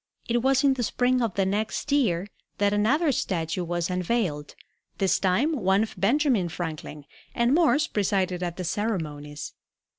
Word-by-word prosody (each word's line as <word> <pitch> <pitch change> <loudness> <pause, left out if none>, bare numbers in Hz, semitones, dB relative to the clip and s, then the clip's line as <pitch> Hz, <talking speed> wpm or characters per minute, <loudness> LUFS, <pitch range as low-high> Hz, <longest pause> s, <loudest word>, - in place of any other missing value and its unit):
It 240 0 +1
was 270 +2 +3
in 275 -1 +5
the 260 - -3
spring 250 +2 +1
of 225 -6 -1
the 195 0 +1
next 215 +8 -2
year 205 -11 +2 0.3
that 205 0 +2
another 275 +10 +2
statue 175 - -2
was 175 +1 -2
unveiled, 180 -5 -1 0.4
this 190 -2 +2
time 210 - +2
one 195 -4 +2
of 220 - -5
Benjamin 230 - +2
Franklin, 155 -3 -6 0.3
and 235 +2 +2
Morse 310 -2 +4
presided 190 - 0
at 175 -1 -3
the 185 - -4
ceremonies. 155 -7 -3
200 Hz, 155 wpm, -26 LUFS, 175-245 Hz, 0.4 s, in